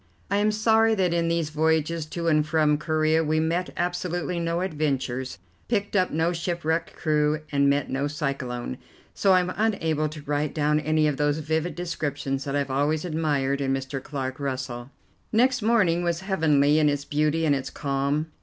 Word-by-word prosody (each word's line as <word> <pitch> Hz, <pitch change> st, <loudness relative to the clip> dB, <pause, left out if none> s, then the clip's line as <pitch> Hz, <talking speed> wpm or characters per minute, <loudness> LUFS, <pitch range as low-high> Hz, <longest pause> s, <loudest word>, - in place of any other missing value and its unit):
I 200 Hz, -, +3 dB
am 210 Hz, +1 st, +3 dB
sorry 220 Hz, +1 st, +3 dB
that 185 Hz, -4 st, +1 dB
in 170 Hz, -1 st, +1 dB
these 165 Hz, -2 st, 0 dB
voyages 160 Hz, +1 st, 0 dB
to 170 Hz, +2 st, -4 dB
and 155 Hz, -2 st, +4 dB
from 150 Hz, -1 st, +2 dB
Corea 155 Hz, 0 st, +1 dB
we 155 Hz, 0 st, +1 dB
met 170 Hz, +3 st, 0 dB
absolutely 175 Hz, 0 st, -2 dB
no 170 Hz, +1 st, -1 dB
adventures, 135 Hz, -, -2 dB, 0.3 s
picked 205 Hz, -3 st, -1 dB
up 185 Hz, -2 st, +3 dB
no 165 Hz, +3 st, 0 dB
shipwrecked 170 Hz, -1 st, -2 dB
crew, 150 Hz, -1 st, +1 dB
and 140 Hz, -1 st, +3 dB
met 140 Hz, 0 st, +1 dB
no 135 Hz, +2 st, -1 dB
cyclone, 135 Hz, -, -4 dB, 0.3 s
so 195 Hz, -, +3 dB
I 185 Hz, -, +5 dB
am 180 Hz, 0 st, -3 dB
unable 160 Hz, -8 st, 0 dB
to 155 Hz, -1 st, -9 dB
write 145 Hz, 0 st, -2 dB
down 150 Hz, 0 st, +2 dB
any 155 Hz, +1 st, +1 dB
of 145 Hz, -2 st, -1 dB
those 145 Hz, 0 st, +1 dB
vivid 160 Hz, +2 st, -2 dB
descriptions 145 Hz, -5 st, -3 dB
that 140 Hz, 0 st, -2 dB
I -, -, +2 dB
have 140 Hz, -1 st, -1 dB
always 150 Hz, +4 st, 0 dB
admired 145 Hz, -4 st, 0 dB
in 135 Hz, -1 st, +1 dB
Mr. 135 Hz, 0 st, -4 dB
Clark 130 Hz, -2 st, -5 dB
Russell. 130 Hz, -3 st, -4 dB, 0.4 s
Next 250 Hz, +2 st, +3 dB
morning 205 Hz, -7 st, +3 dB
was 170 Hz, 0 st, -1 dB
heavenly 155 Hz, -6 st, +3 dB
in 150 Hz, -1 st, +4 dB
its 145 Hz, -1 st, -2 dB
beauty 155 Hz, +2 st, +1 dB
and 150 Hz, -, +3 dB
its 135 Hz, -2 st, -2 dB
calm. 140 Hz, +3 st, -1 dB
155 Hz, 180 wpm, -25 LUFS, 145-170 Hz, 0.4 s, I